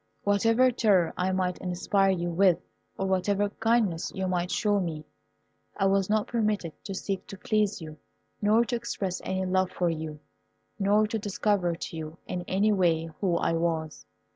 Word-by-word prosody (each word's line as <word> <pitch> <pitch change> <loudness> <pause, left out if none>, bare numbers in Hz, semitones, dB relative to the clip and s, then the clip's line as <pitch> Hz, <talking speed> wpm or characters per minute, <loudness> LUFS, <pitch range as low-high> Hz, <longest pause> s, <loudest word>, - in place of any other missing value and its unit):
Whatever 225 +5 +3
terror 200 -8 +3
I 185 +1 0
might 185 -1 -1
inspire 190 +2 +1
you 175 -2 0
with, 180 0 +4 0.4
or 195 - -1
whatever 195 +2 +1
kindness 225 -6 0
you 190 0 -1
might 180 -1 -1
show 205 -1 +1
me, 160 -4 -4 0.7
I 195 - +1
was 195 0 +2
not 215 0 +2
permitted 210 -8 -1
to 195 - -4
seek 195 0 -4
to 195 - -8
please 210 -2 0
you, 155 -1 -9 0.4
nor 215 +3 +4
to 240 - -2
express 205 -6 -3
any 190 0 -2
love 185 0 +1
for 175 -2 0
you, 155 -2 -5 0.6
nor 205 +2 +3
to 220 +1 -2
discover 200 -3 0
to 165 - -7
you 160 0 -6
in 180 - -4
any 200 +3 +2
way 165 -4 +1
who 180 -4 +2
I - - +1
was. 165 -2 -2
190 Hz, 170 wpm, -27 LUFS, 175-205 Hz, 0.7 s, with